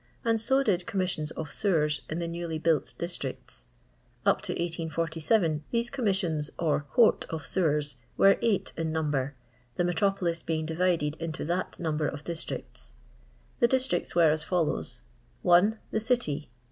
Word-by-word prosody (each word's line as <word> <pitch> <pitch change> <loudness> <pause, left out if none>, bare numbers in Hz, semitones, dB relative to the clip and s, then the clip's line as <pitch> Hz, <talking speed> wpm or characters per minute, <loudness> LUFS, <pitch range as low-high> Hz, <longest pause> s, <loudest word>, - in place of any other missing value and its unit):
and 225 -1 +2
so 270 +4 +3
did 180 -7 +1
Commis 185 -2 0
sions 155 -3 -2
of 160 -1 -5
J:5cwer8 150 -7 +1
in 155 - -2
the 170 -1 -2
newly 170 -1 -3
built 160 -2 +1
distri^ 170 -6 -3
ts. - - -10 0.6
Cp - - +2
U - - -1 0.3
1817 160 +1 +1
these 235 0 -1
Commissions 190 - 0
or 160 -3 +2
Court 235 -3 +5
of 160 -2 -4
Sewert 150 -6 +1 0.2
wen 195 - +7
a'f/fit 225 -5 0
in 160 -1 -2
number, 145 -3 -1 0.4
the 175 - +1
metropolis 175 -1 +1
being 160 -1 -2
divided 160 -2 +1
into 165 -1 -4
that 175 +3 -2
number 155 -3 0
of 145 +1 -5
districts. 170 0 -6 0.6
The 235 - +5
districts 255 -11 0
were 165 -3 +6
as 155 0 0
follows: 170 -2 -1 0.4
1. 180 +5 +5
The 220 - +1
City. 220 - -1
170 Hz, 155 wpm, -28 LUFS, 155-195 Hz, 0.6 s, wen